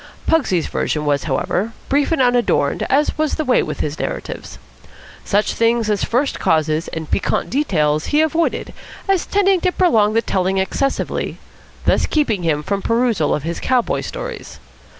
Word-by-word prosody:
Pugsy's 250 - +2
version 150 -1 -2
was, 145 -1 0
however, 180 +9 -1
brief 285 +3 +1
and 325 - +1
unadorned, 245 -1 +1
as 290 +3 +2
was 310 -1 +1
the 310 - -2
way 255 - +3
with - - -4
his 150 +1 -3
narratives. - - -5 0.7
Such 205 +1 +1
things 230 -1 +1
as 205 - 0
first 255 +4 0
causes 155 0 +1
and 160 -1 -6
piquant - - 0
details 155 - +1
he 300 - +3
avoided, 320 +1 0 0.3
as 385 -3 +1
tending 390 -2 +2
to 365 - +2
prolong 225 - +3
the 230 +1 +2
telling 190 0 0
excessively, 270 +8 -1 0.5
thus - - +2
keeping 235 - 0
him 155 -3 0
from 200 +4 -2
perusal 230 -9 +1
of 150 - -5
his 170 +2 -3
cowboy 250 -2 +1
stories. - - -7
230 Hz, 160 wpm, -19 LUFS, -, 0.7 s, way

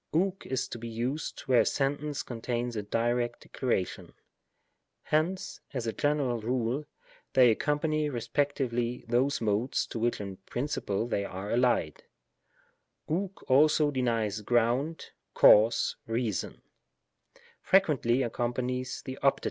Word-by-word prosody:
ovx 190 +3 0
is 130 -1 -1
to 120 - -7
be 115 - -6
used 120 +7 -3
where 130 -3 +3
a - - +1
sentence 145 +1 -1
contains 120 0 -3
a 105 - -1
direct 120 +3 -1
declaration. 120 -8 -3 0.9
Hence, 165 +5 -1 0.2
as 125 -3 -2
a 115 - -2
general 145 -5 0
rule, 125 +4 -1 0.5
they 125 -3 +7
accompany 150 +4 0
respectively 125 -2 -1
those 130 +4 +1
Modes 110 +4 0
to 115 - -6
which 120 +1 0
in 100 -2 -6
principle 110 -1 -3
they 100 - -1
are 100 +1 -6
allied, 120 -10 +1 1.1
ovx 190 +4 -3
also 150 +2 +4
denies 115 -5 0
ground, 120 +8 0 0.2
cause, 110 +3 +5
reason; 115 -3 -2 1.0
frequently 145 -10 +3
accom 120 0 -1
panies 125 0 -3
the 130 0 -7
Opt. 140 0 +3
125 Hz, 125 wpm, -29 LUFS, 115-145 Hz, 1.1 s, they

